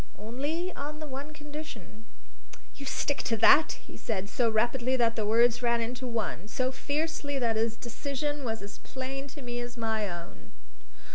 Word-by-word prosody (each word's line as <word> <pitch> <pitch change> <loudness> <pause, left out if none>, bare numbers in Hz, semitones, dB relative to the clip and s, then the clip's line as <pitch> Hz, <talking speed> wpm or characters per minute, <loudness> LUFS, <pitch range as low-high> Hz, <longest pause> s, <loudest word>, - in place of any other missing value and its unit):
"Only 290 - -2
on 295 +2 -4
the 310 - -4
one 280 +1 -5
condition." 295 -7 -8 0.7
"You 275 - -7
stick 285 +1 0
to 230 - 0
that?" 285 +8 +7
he - - -12
said, 200 -3 -2
so 235 +1 +3
rapidly 240 +3 +2
that 230 -2 +3
the 215 -2 0
words 235 +2 +5
ran 235 -1 +3
into 245 +2 -2
one, 220 -5 -2
so 255 +3 0
fiercely 290 +1 -1
that 235 -4 +2
his 225 +1 +1
decision 280 +5 -3
was 225 -4 -2
as 200 0 -8
plain 270 +1 -5
to 280 0 -9
me 240 -1 -3
as 240 0 -5
my 220 -3 0
own. 170 - -8
245 Hz, 170 wpm, -30 LUFS, 225-285 Hz, 0.7 s, that